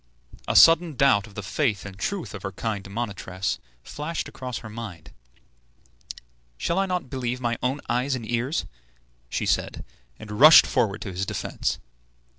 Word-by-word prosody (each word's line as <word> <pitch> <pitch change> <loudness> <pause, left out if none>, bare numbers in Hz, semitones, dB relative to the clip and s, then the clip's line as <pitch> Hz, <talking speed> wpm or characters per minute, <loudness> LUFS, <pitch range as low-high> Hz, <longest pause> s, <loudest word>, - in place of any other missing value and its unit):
A - - -1
sudden 165 -1 +7
doubt 120 -7 +3
of 100 - -16
the 105 - -5
faith 105 0 -1
and 100 -1 -8
truth 185 - -4
of 100 - -7
her 95 - -4
kind 100 -2 -4
monitress 100 -4 -3 0.2
flashed 155 - -4
across 125 -2 -6
her 110 - -9
mind. 105 -7 -9 1.4
"Shall 170 - 0
I 195 - +1
not 180 -8 -3
believe 125 -1 -2
my 120 -1 -1
own 130 +3 -1
eyes 125 +3 0
and 115 -3 -6
ears?" 120 - -1 0.6
she - - -2
said, - - -1 0.3
and 105 0 -8
rushed 155 +2 +10
forward 110 -6 0
to 100 - -6
his 95 +1 -3
defence. - - -2
120 Hz, 160 wpm, -25 LUFS, 100-140 Hz, 1.4 s, rushed